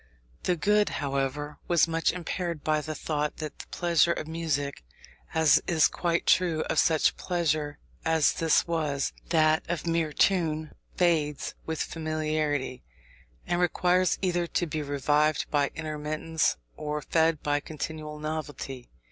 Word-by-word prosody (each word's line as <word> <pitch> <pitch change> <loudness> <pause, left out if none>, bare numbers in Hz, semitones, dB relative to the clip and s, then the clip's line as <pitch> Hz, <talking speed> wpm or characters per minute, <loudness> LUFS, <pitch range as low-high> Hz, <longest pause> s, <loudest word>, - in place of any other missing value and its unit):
The 180 - +2
good, 210 +4 +3
however, 140 +1 -2
was 170 -1 +4
much 165 0 +1
impaired 175 -2 -4
by 155 -1 +1
the 155 +1 -5
thought 150 -1 -2
that 155 -2 -6
the - - -9
pleasure 170 -1 +2
of 155 - -5
music 155 - -2 0.5
(as 160 -3 +5
is 160 -3 +4
quite 170 -1 -1
true 170 -4 +3
of - - 0
such 160 -2 +3
pleasure 155 -4 -1 0.3
as 160 -2 +3
this 165 -2 +3
was, 150 -4 -1 0.2
that 155 -1 +3
of 175 -1 -2
mere 165 -2 0
tune) 160 -2 +1 0.2
fades 155 -5 +1
with 160 -1 -1
familiarity, 155 -5 -2 0.6
and 175 0 0
requires 180 +1 +2
either 175 -2 +1
to 175 - 0
be 155 -1 -3
revived 145 +1 +1
by 145 -1 +2
intermittence, 155 - -1 0.2
or 150 0 -3
fed 160 -2 +2
by 145 0 +1
continual 155 0 -6
novelty. 150 -4 -5
155 Hz, 140 wpm, -28 LUFS, 150-170 Hz, 0.6 s, as